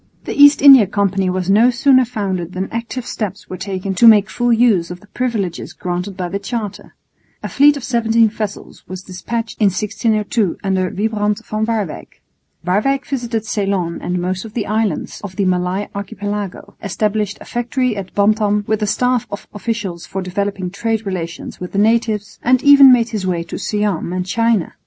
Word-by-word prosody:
The - - -4
East 285 -1 +6
India 270 -7 +9
Company 195 -2 0
was 180 -1 -2
no 215 +5 +5
sooner 260 0 +4
founded 190 -7 -3
than 185 +1 -4
active 230 +2 -5
steps 210 -5 -5
were - - -3
taken 190 0 -4
to 230 +5 +5
make 210 -3 +6
full 240 +3 0
use 225 -7 +3
of 180 0 -7
the 205 - -19
privileges 210 -7 -3
granted 180 0 -4
by 180 -2 -3
the 195 +3 -4
Charter. 210 -1 -6 0.5
A - - -2
fleet 290 +1 +4
of 275 - -8
17 230 -2 +2
vessels 210 -1 -6
was 185 0 -7
despatched 225 +6 -5
in - - +5
1602 210 0 0
under 190 -2 0
Wybrand 210 +1 -1
van 215 +1 -2
Waerwyck. 215 -8 -4 0.5
Waerwyck 215 +10 +1
visited 235 -5 -3
Ceylon 195 -5 -2
and 180 0 -2
most 185 +1 -2
of 225 -1 -11
the 225 - -1
islands 215 -5 -2
of 190 -2 -7
the 200 0 0
Malay 185 +2 0
Archipelago, 205 -1 -5
established 210 +1 -1
a - - -12
factory 245 0 -1
at 195 -2 -7
Bantam 210 0 +2
with 215 0 -1
a 210 - 0
staff 250 +2 0
of 205 - -8
officials 205 -4 -4
for 190 0 -4
developing 190 0 -3
trade 225 +1 -2
relations 175 -3 -5
with 180 - -7
the - - -2
natives, 215 -1 +1
and 255 +1 +2
even 280 -2 +8
made 235 -2 +3
his 210 -5 -3
way 175 -2 -1
to - - -7
Siam 205 -5 -1
and 185 0 -2
China. 230 -1 0
205 Hz, 180 wpm, -18 LUFS, 190-230 Hz, 0.5 s, India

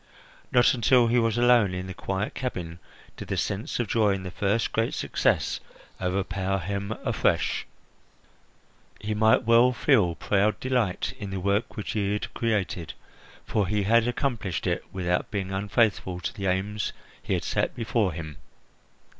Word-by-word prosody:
Not 120 -1 +5
until 125 0 +4
he 120 +1 +3
was 115 -1 +1
alone 120 -6 +4
in 90 0 -4
the 95 - -6
quiet 95 +2 -3
cabin 90 -9 -5 0.4
did - - -7
the - - -2
sense 105 +10 -2
of 120 - 0
joy 105 -1 +3
in 95 - -6
his 90 -1 -7
first 105 +2 0
great 115 +1 0
success - - 0 0.4
overpower 95 +1 -1
him 100 +3 -3
afresh. - - 0 1.3
He 105 +1 -3
might 110 +1 +4
well 115 +2 +5
feel 110 - +3
proud 100 +5 +1
delight 125 -8 0
in 100 - -5
the 95 0 -3
work 100 +6 -1
which 105 - -4
he 100 -2 0
had 105 - -4
created, 100 -7 -1 0.5
for 105 -4 0
he 105 +1 0
had 115 +3 +4
accomplished 120 - -2
it - - 0
without 90 -1 -1
being 95 -2 -3
unfaithful 95 -2 0
to - - -3
the 100 -1 -3
aims 100 +3 -1 0.3
he - - -1
had - - -2
set - - -1
before 115 -4 0
him. 80 -3 -7
100 Hz, 160 wpm, -26 LUFS, 95-115 Hz, 1.3 s, Not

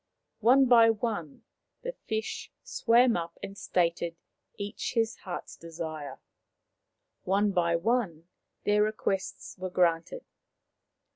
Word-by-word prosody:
One 255 +5 +6
by 235 -2 +7
one 215 - -2 0.4
the - - -2
fish 220 - -4
swam 245 - +4
up 170 -1 -4
and 195 - -6
stated 170 -3 0 0.4
each 205 +4 -4
his 225 -1 +1
heart's 180 -2 -7
desire. 160 -4 -6 1.0
One 200 +2 +2
by 170 -3 +2
one 175 -4 0 0.4
their 205 0 +3
requests 205 -3 -2
were 185 0 -3
granted. 175 - +1
200 Hz, 110 wpm, -29 LUFS, 170-230 Hz, 1.0 s, by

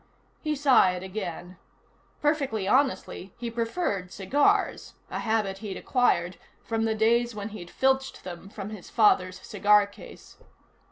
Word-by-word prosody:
He 305 -1 -1
sighed 245 -11 +4
again. 185 -2 -6 0.7
Perfectly 275 -10 0
honestly, 255 -6 0
he 235 -1 -5
preferred 230 - -2
cigars, 230 +10 +1 0.2
a - - -3
habit 215 -4 -1
he'd 200 -3 -6
acquired 180 -9 +1 0.3
from 225 0 -1
the 220 -1 0
days 235 +1 +2
when 205 0 -5
he'd 190 -5 -9
filched 265 +3 0
them 180 +1 -8
from 205 0 -7
his 210 -5 -9
father's 185 -5 +3
cigar 210 0 +4
case. 200 - -14
215 Hz, 130 wpm, -27 LUFS, 190-240 Hz, 0.7 s, sighed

